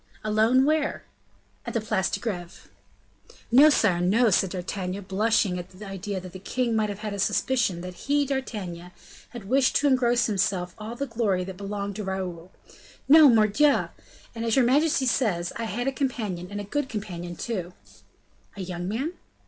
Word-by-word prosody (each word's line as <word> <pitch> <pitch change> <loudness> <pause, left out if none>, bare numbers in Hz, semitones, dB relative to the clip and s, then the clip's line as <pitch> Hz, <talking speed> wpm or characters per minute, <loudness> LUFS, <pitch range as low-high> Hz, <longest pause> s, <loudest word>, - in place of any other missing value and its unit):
"Alone, 220 +5 +3
where?" 305 0 0 0.6
"At - - -6
the - - +3
Place 210 -3 0
de - - -3
Greve." 180 -7 -6 0.8
"No, 280 +6 +8
sire, 195 - +2
no," 215 +6 +3
said 190 0 +3
D'Artagnan, 185 +1 -4
blushing 195 -1 +1
at 175 - -8
the 190 +3 -11
idea 195 0 -4
that 180 -1 -10
the 185 - -8
king 235 +4 -1
might 215 -1 +1
have 205 +1 -5
a 200 - -5
suspicion 205 -3 +1
that 180 0 -7
he, 285 +10 0
D'Artagnan, 205 -11 -4 0.4
had 235 -6 -9
wished 260 +2 +2
to - - +2
engross 245 -3 +3
to - - -1
himself 180 -3 0
all 220 +2 -6
the 280 - -3
glory 220 -7 0
that 185 0 -8
belonged 200 0 -4
to 210 - -4
Raoul; 185 -2 -5 0.6
"no, 305 0 +8
mordioux! 230 +6 +3 0.4
and 230 -1 -5
as 230 -1 +1
your 260 - +4
majesty 280 +2 +3
says, 200 -9 0
I 230 - -3
had 240 +4 -3
a - - +2
companion, 220 -10 -3
and 205 0 -5
a - - -4
good 270 +7 -2
companion, 175 -5 -6
too." 185 -4 -4 0.8
"A - - -5
young 175 -1 -5
man?" 260 - -2
210 Hz, 180 wpm, -26 LUFS, 185-245 Hz, 0.8 s, No